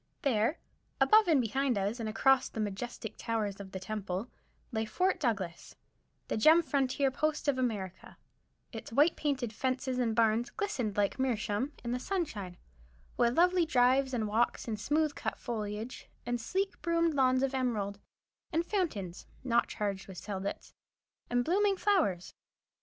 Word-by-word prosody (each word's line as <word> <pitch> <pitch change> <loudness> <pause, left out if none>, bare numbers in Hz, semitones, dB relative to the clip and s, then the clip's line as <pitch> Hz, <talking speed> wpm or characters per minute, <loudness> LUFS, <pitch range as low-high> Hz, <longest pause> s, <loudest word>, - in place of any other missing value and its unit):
There, 255 +2 +2 0.4
above 435 -1 +6
and 315 -5 +5
behind 255 +1 +1
us, 200 +5 -1
and 220 -1 -2
across 265 +5 +3
the - - -7
majestic 215 +2 -4
towers 215 -4 -2
of 195 -1 -8
the 190 - -5
Temple, 200 +1 -4 0.4
lay 220 -2 0
Fort 365 - 0
Douglas, 200 - -2 0.5
the - - -1
gem 315 +9 +6
frontier 275 -2 +1
post 305 +3 -1
of 270 -2 +2
America, 200 -7 -3 0.5
its 225 -1 -8
white 290 +8 +4
painted 265 -6 -1
fences 260 +1 -1
and 230 -3 +1
barns 230 +1 +3
glistened 250 - -3
like 205 +4 +1
meerschaum 250 +1 -1
in 235 - -3
the 250 - -1
sunshine, 225 - -3 0.6
with 235 +1 +2
lovely 360 +1 +5
drives 265 -2 +3
and 230 -4 -1
walks, 225 +4 0
and 215 -2 -3
smooth 300 +5 +1
cut - - -4
foliage, 220 0 -5 0.2
and 240 -1 -2
sleek 385 - -2
broomed 335 -1 +2
lawns 260 -2 +3
of 270 0 0
emerald, 215 -6 -1 0.5
and 335 +1 +1
fountains 225 - -2 0.2
(not 240 -3 +2
charged 200 -3 -3
with 190 -2 -10
seidlitz), 195 0 -5 0.6
and 245 0 +1
blooming 395 +3 +2
flowers. 325 - +1
245 Hz, 150 wpm, -31 LUFS, 210-285 Hz, 0.6 s, above